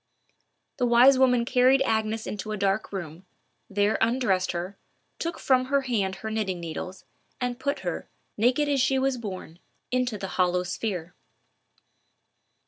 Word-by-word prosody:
The 250 -2 +1
wise 250 +3 +6
woman 250 -2 +4
carried 260 +2 +4
Agnes 220 -2 0
into 210 +1 -5
a 215 - -2
dark 195 +1 0
room, 175 -3 -6 0.5
there 205 +2 +1
undressed 225 -6 +2
her, 180 +3 -4 0.4
took 335 0 -3
from 255 -1 +2
her 280 +1 +2
hand 210 -8 -1
her 220 - -2
knitting 200 -5 -2
needles, 170 +3 -6 0.3
and 245 0 -2
put 280 +2 -2
her, - - -4 0.3
naked 250 +7 +2
as 280 -2 +2
she 265 +1 +2
was 265 -1 0
born, 185 -6 -7 0.3
into 250 -3 0
the 195 - -5
hollow 180 0 +3
sphere. 180 -2 -4
220 Hz, 145 wpm, -26 LUFS, 190-255 Hz, 0.5 s, wise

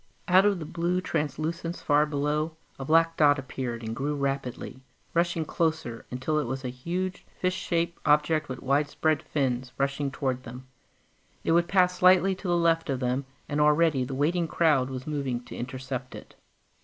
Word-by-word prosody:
Out 185 +3 +6
of 200 -2 +2
the 160 - -6
blue 170 +3 -1
translucence 165 +1 -3
far 150 +1 +3
below, 150 +2 -1 0.2
a 135 - -4
black 165 +2 +4
dot 145 -1 +5
appeared 130 -3 -5
and 110 0 -4
grew 145 +3 -2
rapidly, 135 -2 -3 0.3
rushing 170 -1 +1
closer 160 -9 -2
until 130 +5 -1
it 145 - -2
was 130 +2 -4
a - - -1
huge 180 +9 -4 0.2
fish 185 0 +1
shaped 170 -2 -1
object 150 0 +2
with 130 -1 -6
widespread 145 +3 +1
fins, 130 -5 -2
rushing 140 +1 0
towards 130 -2 -2
them. 125 +1 -10 0.8
It - - +1
would 170 +1 +4
pass 180 -1 +3
slightly 185 +1 +5
to 190 +1 -7
the 175 -1 +2
left 165 -2 +2
of 135 -2 0
them, 125 +2 -1 0.2
and 145 +1 0
already 150 -2 +4
the 130 +1 -4
waiting 165 +5 +1
crowd 150 -6 +2
was 130 -1 -6
moving 135 -5 -2
to - - -10
intercept 130 0 -5
it. - - -11
150 Hz, 175 wpm, -27 LUFS, 130-170 Hz, 0.8 s, Out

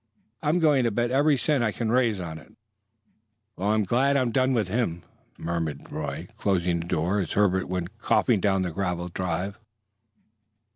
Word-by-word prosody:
I'm 150 +4 +2
going 150 -6 +4
to - - +3
bet 120 +3 -1
every 145 +2 +3
cent 130 +1 +1
I 110 - +1
can 110 +1 -2
raise 120 -5 +2
on 80 -3 -6
it." - - -18 1.0
"Well, 100 +3 -1
I'm 110 0 +3
glad 135 +8 +2
I'm 125 -3 +1
done 130 +1 +2
with 110 -5 +1
him!" 95 -5 -1 0.3
muttered 80 -4 -4
Roy, - - -4
closing 90 -3 +1
the 85 - -5
door 85 +5 0
as 90 - -2
Herbert 95 -3 +2
went 90 +4 -4
coughing 115 -1 +2
down 95 -1 +2
the 90 - -2
gravel 90 -1 -2
drive. 90 +3 -3
100 Hz, 175 wpm, -26 LUFS, 90-120 Hz, 1.0 s, going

